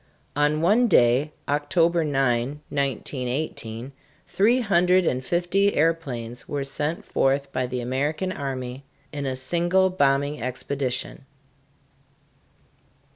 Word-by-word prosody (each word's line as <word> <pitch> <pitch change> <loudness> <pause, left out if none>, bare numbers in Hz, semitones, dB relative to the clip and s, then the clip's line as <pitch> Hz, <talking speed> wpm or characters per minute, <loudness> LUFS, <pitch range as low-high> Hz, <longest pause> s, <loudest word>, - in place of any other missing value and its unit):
On 150 +1 +2
one 225 +8 +4
day, 130 - +4 0.2
October 165 +4 +2
9, 135 -1 0
1918, 130 -2 -2 0.3
three 235 +6 +2
hundred 180 -3 +3
and 130 -4 0
fifty 180 +6 +1
airplanes 135 -8 -1
were 145 -1 -2
sent 150 +4 -3
forth 135 +1 0
by 130 -1 -1
the 125 0 -3
American 145 +9 -1
army 130 -4 -5 0.3
in 145 -1 -3
a 130 - -1
single 175 +7 +1
bombing 140 -3 +1
expedition. 130 +1 -3
145 Hz, 105 wpm, -24 LUFS, 130-170 Hz, 0.3 s, one